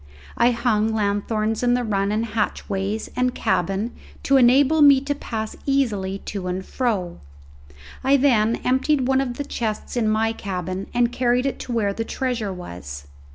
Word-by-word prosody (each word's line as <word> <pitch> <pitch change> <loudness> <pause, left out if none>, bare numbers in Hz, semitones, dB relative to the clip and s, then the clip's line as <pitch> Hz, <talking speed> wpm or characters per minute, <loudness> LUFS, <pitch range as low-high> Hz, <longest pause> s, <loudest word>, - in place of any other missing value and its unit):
I 235 +1 +4
hung 230 -2 +1
lanthorns 215 +1 -1
in 245 0 +3
the 250 - 0
run 200 -2 0
and 220 +2 0
hatchways 210 -1 -2
and 250 0 0
cabin 195 +6 0 0.3
to 275 - +4
enable 270 +5 +5
me 280 -2 +8
to 285 +1 -1
pass 220 -6 -5
easily 210 -9 0
to 195 -3 -4
and 185 +1 -3
fro; 200 -9 -2 0.8
I 275 +2 +4
then 235 -5 +3
emptied 260 +1 +2
one 265 0 +3
of 250 -3 -3
the 285 - -3
chests 220 -3 -4
in 225 -3 +1
my 220 +1 +1
cabin 185 -2 -4
and 240 -1 +2
carried 245 +1 +1
it 275 - -2
to - - -6
where 210 -4 0
the 225 - -3
treasure 240 -4 -2
was. 80 - -8
225 Hz, 165 wpm, -22 LUFS, 200-250 Hz, 0.8 s, me